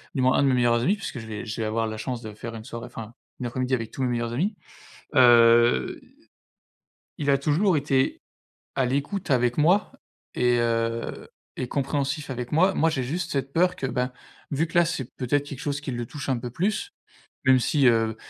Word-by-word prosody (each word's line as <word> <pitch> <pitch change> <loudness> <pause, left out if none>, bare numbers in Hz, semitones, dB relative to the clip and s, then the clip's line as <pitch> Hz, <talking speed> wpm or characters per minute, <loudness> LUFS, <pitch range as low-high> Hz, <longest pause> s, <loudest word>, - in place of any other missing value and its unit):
du 135 - +1
moins 130 0 +4
un - - +3
de - - +3
mes 130 - +3
meilleurs 120 -1 +3
amis 190 +10 +2
puisque 200 - -6
je 115 - -9
vais 105 -1 -6
je 110 0 -4
vais - - 0
avoir 115 +1 0
la 110 0 -4
chance 120 +2 -4
de 110 - -7
faire 115 +2 -7
une 110 - -8
soirée 115 -1 -7
enfin 115 0 -9 0.3
une 125 - -4
après-midi 130 +2 -1
avec 115 -3 -5
tous - - -6
mes 130 - +1
meilleurs 120 -1 -2
amis. 195 - -1 0.6
Heu, 120 -2 +5 1.2
il 145 -1 0
a 140 - +4
toujours 160 +6 +2
été 135 -2 +1 0.6
à 130 - +2
l'écoute 145 +7 -2
avec 120 -1 +2
moi 175 +7 +3 0.4
et 125 0 +3
heu, 115 0 -1 0.3
et 125 - -3
compréhensif 140 +1 -2
avec 125 -2 -5
moi. 185 +5 +3
Moi 165 +1 +3
j'ai 135 - -1
juste 165 +6 -3
cette 135 -1 -2
peur 180 +2 +3
que 135 - -3
ben, 125 0 -1 0.4
vu 150 +3 0
que 165 - -2
là, 175 - +6
c'est 130 -6 -3
peut-être 140 +3 0
quelque 140 -3 -7
chose 145 0 -2
qui 145 - -6
le 120 -1 -3
touche 145 +2 -7
un 130 - +1
peu 120 +1 -5
plus, 215 - -1 0.5
même 130 -1 +5
si, 135 +1 +3
heu, 115 -2 +3
130 Hz, 215 wpm, -25 LUFS, 120-145 Hz, 1.2 s, là